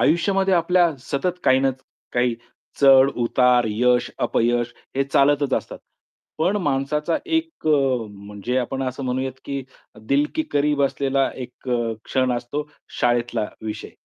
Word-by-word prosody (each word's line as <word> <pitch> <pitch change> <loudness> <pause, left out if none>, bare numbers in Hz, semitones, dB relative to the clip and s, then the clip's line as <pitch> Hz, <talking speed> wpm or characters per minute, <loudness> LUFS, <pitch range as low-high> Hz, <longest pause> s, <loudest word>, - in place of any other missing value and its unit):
आयुष्यामध्ये 190 +4 +2
आपल्या 175 0 +3
सतत 150 +7 -2
काही 130 - +5
नच 135 -1 -1 0.3
काही 120 -1 +1 0.5
चढ-उतार, 125 -2 +5
यश, 125 +3 +2
अपयश 120 0 +1 0.2
हे 135 - +2
चालतच 140 0 +2
असतात. - - -4 0.6
पण 180 +6 +2
माणसाचा 150 -1 0
एक 325 - -2
अ, 135 -6 +2
म्हणजे 105 +4 -5
आपण 130 +2 -2
असं 130 +1 -4
म्हणूयात, 130 +1 -2
की 140 -1 -4 0.5
दिल 140 +1 +3
की 315 - +1
करीब 145 0 +2
असलेला 135 0 +1
एक 125 0 -9
अ, 120 -2 0
क्षण 130 -1 +1
असतो 145 +5 -4 0.3
शाळेतला 120 -2 +1 0.2
विषय. 110 -1 -5
135 Hz, 130 wpm, -22 LUFS, 125-145 Hz, 0.6 s, काही